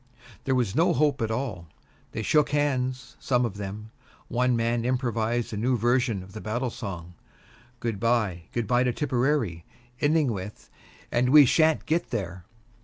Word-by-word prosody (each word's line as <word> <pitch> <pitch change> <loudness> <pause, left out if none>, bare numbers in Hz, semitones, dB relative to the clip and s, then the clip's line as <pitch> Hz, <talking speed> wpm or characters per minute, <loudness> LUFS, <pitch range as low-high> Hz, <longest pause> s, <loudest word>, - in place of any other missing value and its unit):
There 135 -2 +1
was 120 -6 0
no 170 +2 +3
hope 145 -2 +1
at 110 - 0
all. 110 -8 -3 0.4
They 110 - -4
shook 150 +4 +3
hands, 130 -3 -1
some 125 -2 +1
of 100 -4 -5
them. 105 +2 -7 0.4
One 125 0 +2
man 115 0 0
improvised 120 -2 -1
a - - -3
new 125 +4 +1
version 120 -3 +1
of 95 - -14
the 110 - -7
battle 120 +3 -2
song, 90 -6 -7 0.7
"Good 115 -4 -3
by, 105 -7 0
good 120 -1 -2
by 120 +3 +2
to 125 -1 +1
Tipperary," 125 - 0 0.4
ending 150 -3 +2
with 100 0 -7 0.4
"And 125 +1 +2
we 145 +1 +8
shan't 160 +4 +3
get 165 +2 0
there." 95 -6 -4
120 Hz, 165 wpm, -26 LUFS, 110-130 Hz, 0.7 s, we